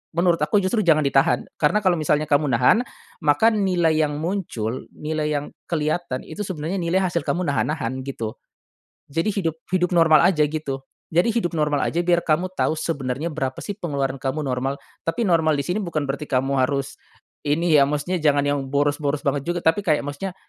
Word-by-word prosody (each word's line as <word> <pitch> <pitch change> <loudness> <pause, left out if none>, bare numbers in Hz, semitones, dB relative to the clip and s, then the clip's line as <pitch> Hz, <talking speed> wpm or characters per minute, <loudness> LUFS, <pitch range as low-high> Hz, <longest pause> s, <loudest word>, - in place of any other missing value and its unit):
Menurut 170 0 +3
aku 150 +7 +2
justru 195 +4 +1
jangan 155 -3 +5
ditahan 140 +4 +2 0.2
karena 160 +8 +3
kalo 185 -3 +2
misalnya 155 -1 +1
kamu 145 0 +3
nahan, 125 - +4 0.4
maka 150 +9 +4
nilai 180 -6 +2
yang 150 -2 +1
muncul, 155 - -3
nilai 155 0 -2
yang 145 - -4 0.2
kelihatan 155 -4 -1
itu 210 - -7
sebenarnya 175 0 -3
nilai 170 +2 +1
hasil 175 -3 0
kamu 180 +1 0
nahan-nahan 140 -3 -1
gitu. 115 -5 -5 0.7
Jadi 165 +8 0
hidup 165 -6 -1 0.2
hidup 180 -1 +2
normal 165 -3 +6
aja 165 -5 +3
gitu. 145 -3 -4 0.3
Jadi 175 +8 +3
hidup 200 -8 -1
normal 150 -2 +1
aja 170 - 0
biar 175 -1 +3
kamu 170 +4 +1
tahu 170 - +1
sebenarnya 145 -1 -2
berapa 135 -3 -3
sih 205 -1 -5
pengeluaran 140 -7 -2
kamu 135 +3 -2
normal 135 +1 -1 0.3
tapi 165 +9 -1
normal 160 -3 +3
di 140 - -1
sini 180 +3 -1
bukan 160 -6 -2
berarti 145 +2 -3
kamu 135 0 +1
harus, 140 0 -3 0.5
ini 160 +3 +1
ya 145 -2 +7
maksudnya 150 +5 -1
jangan 145 -2 +3
yang 145 0 +1
boros-boros 145 +1 0
banget 140 0 +1
juga 175 0 0
tapi 165 +5 +3
kayak 155 -5 +2
maksudnya, 175 +6 -5
155 Hz, 180 wpm, -23 LUFS, 140-175 Hz, 0.7 s, ya